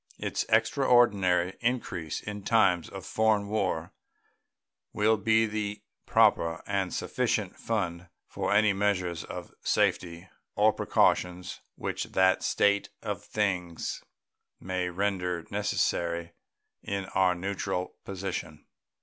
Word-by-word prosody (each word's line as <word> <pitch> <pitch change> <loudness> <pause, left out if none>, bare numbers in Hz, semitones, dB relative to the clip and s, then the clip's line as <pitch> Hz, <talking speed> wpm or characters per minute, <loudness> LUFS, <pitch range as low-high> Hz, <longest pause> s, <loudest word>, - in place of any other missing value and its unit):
Its - - -2
extraordinary 110 -6 +3
increase 105 -10 -2
in 105 -1 -6
times 95 -5 +3
of - - -8
foreign 110 -2 +2
war 95 -6 -1 1.0
will 110 +1 +3
be 110 +2 +3
the 105 -1 -4 0.2
proper 85 0 +3
and 100 -2 -1
sufficient - - -1
fund 90 -6 -3 0.2
for - - -3
any 105 0 +4
measures 90 -4 0
of - - -8
safety 85 0 0 0.3
or - - +4
precaution 90 0 +2 0.3
which - - -3
that 95 0 +3
state 100 0 +2
of - - -4
things 90 -5 -2 0.6
may 90 -1 -2
render 90 -2 -1
necessary 85 0 -1 0.5
in 100 -1 -3
our 90 -1 +3
neutral 90 0 -3
position. 90 -5 -5
95 Hz, 105 wpm, -28 LUFS, 90-105 Hz, 1.0 s, any